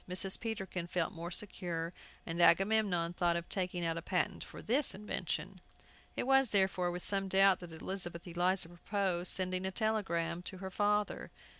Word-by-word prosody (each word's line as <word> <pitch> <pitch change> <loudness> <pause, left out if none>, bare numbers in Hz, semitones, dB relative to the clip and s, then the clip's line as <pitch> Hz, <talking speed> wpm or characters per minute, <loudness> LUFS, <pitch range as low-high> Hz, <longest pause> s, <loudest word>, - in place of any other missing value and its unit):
Mrs. 190 +1 +4
Peterkin 190 -6 -4
felt 175 -1 -1
more 170 +1 -6
secure, 175 -3 -3 0.3
and 170 +1 -2
Agamemnon 190 -2 +3
thought 175 -1 +1
of 170 0 -3
taking 180 -2 -2
out 165 0 0
a - - -3
patent 180 0 -1
for - - -11
this 265 +6 +2
invention. 190 -2 -3 0.5
It - - -2
was, 270 -1 +4
therefore, 190 -3 +2
with 175 0 -5
some 195 -1 0
doubt 190 0 +5
that 175 -2 -9
Elizabeth 175 +1 -5
Eliza 180 0 +1
proposed 180 0 -2
sending 185 -1 +1
a 190 - -1
telegram 180 -6 -1
to 185 +1 -7
her 190 0 -6
father. 210 +1 0
185 Hz, 165 wpm, -34 LUFS, 175-195 Hz, 0.5 s, doubt